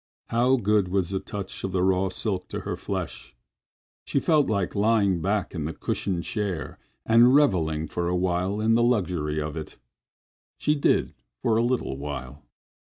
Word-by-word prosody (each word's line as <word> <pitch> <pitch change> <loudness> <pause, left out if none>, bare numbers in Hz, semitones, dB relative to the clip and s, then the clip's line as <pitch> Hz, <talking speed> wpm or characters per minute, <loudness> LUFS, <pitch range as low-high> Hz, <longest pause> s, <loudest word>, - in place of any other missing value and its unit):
How 125 +3 +3
good 105 -4 +2
was 95 -1 0
the 95 - 0
touch 100 -3 -6
of 95 - -2
the 90 -1 +1
raw 95 0 +2
silk 95 0 -2
to - - -5
her - - -3
flesh! - - -5 0.7
She - - 0
felt 155 -1 +3
like 100 -4 0
lying 100 -4 +2
back 100 +3 -1
in 80 -5 -3
the 80 - -3
cushioned 90 -4 -2
chair 100 -6 -3 0.3
and 120 +3 +6
reveling 80 - +2
for 85 +3 -2
a 90 - 0
while 90 +3 0
in 110 +1 +3
the 115 - +4
luxury 90 -10 +1
of 75 0 -4
it. 80 -1 -7 0.8
She 150 - +1
did 145 - +1 0.3
for 110 - +2
a 115 - +3
little 120 - -1
while. 70 -1 -6
95 Hz, 175 wpm, -26 LUFS, 85-115 Hz, 0.8 s, and